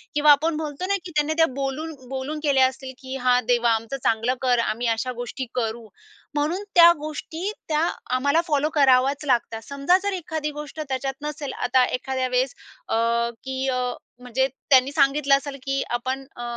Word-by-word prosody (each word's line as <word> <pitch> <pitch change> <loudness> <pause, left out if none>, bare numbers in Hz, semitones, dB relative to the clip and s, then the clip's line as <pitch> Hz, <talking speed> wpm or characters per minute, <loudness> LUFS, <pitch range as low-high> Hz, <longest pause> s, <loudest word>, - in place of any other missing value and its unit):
किंवा 295 0 +6
आपण 310 +2 +3
बोलतो 305 +2 -4
ना 400 - +2
की 345 - -7
त्यांनी 300 +1 +2
त्या 325 - +6
बोलून 280 +4 -3 0.2
बोलून 270 +3 -4
केल्या 265 -3 +4
असतील, 260 0 -7
की 260 -1 -7
"हां, 250 -1 +3
देवा 240 0 +3
आमचं 230 +4 -3
चांगलं 225 +3 +2
कर. 250 -2 +2
आम्ही 235 +1 -1
अशा 255 +3 -2
गोष्टी 250 +2 -5
करू." 225 -1 -2 0.5
म्हणून 315 +7 0
त्या 340 -1 +9
गोष्टी 315 +5 -5 0.2
त्या 315 +2 +2 0.3
आम्हाला 285 +5 +2
फॉलो 295 -1 +1
कराव्याच 275 0 +4
लागतात. 235 -4 0
समजा 280 +6 +3
जर 405 0 -1
एखादी 315 -4 -3
गोष्ट 300 +1 -8
त्याच्यात 270 +1 -2
नसेल, 295 -2 -5
आता 250 +1 +2
एखाद्या 260 +1 -2
वेळेस 255 +1 0 0.3
अ, - - +1 0.5
की 265 0 -3
अ, 255 - 0 0.4
म्हणजे 250 +2 0 0.2
त्यांनी 265 -1 +5
सांगितलं 280 -1 +3
असेल 280 -1 -7
की 275 0 -1
"आपण 260 +3 -2
अ, 240 - -6
270 Hz, 175 wpm, -24 LUFS, 255-300 Hz, 0.5 s, त्या